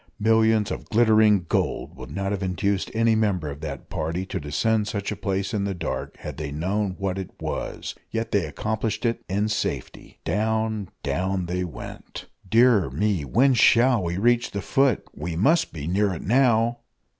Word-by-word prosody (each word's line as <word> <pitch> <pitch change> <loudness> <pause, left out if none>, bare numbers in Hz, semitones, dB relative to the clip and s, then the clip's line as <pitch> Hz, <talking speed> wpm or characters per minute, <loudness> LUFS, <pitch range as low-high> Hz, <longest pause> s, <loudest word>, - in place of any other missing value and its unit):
Millions 110 0 +3
of - - -5
glittering 110 -4 +4
gold - - -1
would 65 -2 -9
not 95 +6 -3
have 100 -1 -2
induced 95 +1 -1
any 115 0 +3
member 100 -9 0
of 70 +2 -9
that 70 -4 -6
party 85 +4 -3
to 95 - -4
descend 105 +9 0
such 100 -3 -3
a - - -2
place 100 +1 -2
in 105 -2 0
the 100 -1 -2
dark, 85 - -4
had - - -7
they 75 -2 -4
known 95 +5 -1
what 95 -1 -2
it 95 - -5
was - - -4 0.2
yet 115 0 -3
they 95 -6 +1
accomplished 110 - -2
it 115 0 0
in 100 +3 +1
safety. 110 - -4
Down, 110 +2 0
down 95 0 -1
they 90 +1 -2
went! 85 - -8 0.2
"Dear 115 -4 +5
me, 100 -6 0
when 130 - +3
shall 120 0 +5
we 85 0 -2
reach 120 +3 +2
the 100 - -4
foot? 135 +5 +2
We 80 +2 -4
must 150 - +3
be 75 -3 -6
near 100 +4 +1
it - - -7
now." 120 0 +3
100 Hz, 180 wpm, -24 LUFS, 90-110 Hz, 0.2 s, Dear